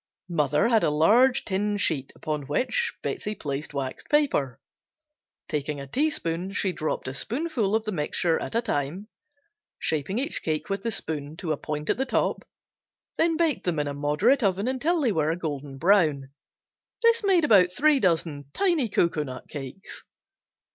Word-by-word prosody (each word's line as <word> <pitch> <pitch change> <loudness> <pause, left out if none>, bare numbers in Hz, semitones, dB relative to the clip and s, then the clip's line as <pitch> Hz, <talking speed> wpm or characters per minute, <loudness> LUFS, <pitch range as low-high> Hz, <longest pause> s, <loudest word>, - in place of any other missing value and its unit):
Mother 150 - +2
had 225 -3 +3
a - - +3
large 220 - +4
tin 205 +2 0
sheet 145 -9 -1
upon 150 -3 -4
which 265 - 0
Betsey 210 +1 -3
placed 145 -2 -4
waxed 135 -2 -5
paper. 275 - +1 0.9
Taking 150 0 -2
a 140 - -6
teaspoon 185 - -1
she 190 - +1
dropped 155 -5 -3
a 130 - -3
spoonful 235 - -1
of 220 - +1
the 215 - -3
mixture 165 0 0
at - - -5
a 230 - +2
time, 175 +2 -3 0.7
shaping 160 +6 -1
each 280 +6 -2
cake 155 +4 -2
with 195 0 -1
the 230 - -2
spoon 155 -7 -4
to 170 -3 -3
a - - +2
point 150 +1 -5
at - - +1
the 265 +1 -1
top, - - 0 0.8
then 325 -1 +2
baked 325 - 0
in 170 -3 +1
a 140 - -3
moderate 150 - +2
oven 200 +1 +1
until 295 +7 +1
they 250 -5 +2
were 155 -4 +1
a 165 - 0
golden 145 -5 -5
brown. 155 -6 +3 0.7
This 465 -1 +4
made 370 -5 +4
about 190 -8 +5
three 290 +8 +3
dozen 165 - 0
tiny 340 - +2
cocoanut 150 -9 -1
cakes. 140 +5 -8
180 Hz, 165 wpm, -26 LUFS, 150-240 Hz, 0.9 s, about